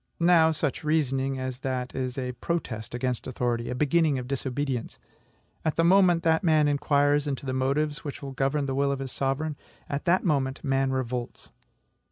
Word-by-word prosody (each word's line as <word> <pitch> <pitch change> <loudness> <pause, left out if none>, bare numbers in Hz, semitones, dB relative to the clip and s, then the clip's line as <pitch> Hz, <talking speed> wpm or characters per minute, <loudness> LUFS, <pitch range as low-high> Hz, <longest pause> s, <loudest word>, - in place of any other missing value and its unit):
Now, 170 -2 +5
such 155 -3 -1
reasoning 135 -3 0
as 130 -1 -4
that 130 -1 -3
is 130 -1 -3
a 125 -1 -2
protest 120 -7 -4
against 125 -1 -2
authority, 120 -2 -1
a 125 - -2
beginning 150 +1 +2
of 125 -1 -5
disobedience. 135 -2 -3 0.7
At 160 - 0
the 165 - +2
moment 175 -1 +5
that 160 +1 +2
man 155 -3 +4
inquires 145 0 +2
into 140 -1 -3
the 130 - -2
motives 145 +3 0
which 145 -1 -6
govern 140 +2 0
the 135 - -2
will 140 +1 +1
of 140 - -1
his 135 -1 -5
sovereign, 140 +2 -2 0.3
at 140 +4 -4
that 180 +1 +3
moment 140 -5 0
man 135 -1 +1
revolts. 125 -2 -4
140 Hz, 175 wpm, -27 LUFS, 130-155 Hz, 0.7 s, Now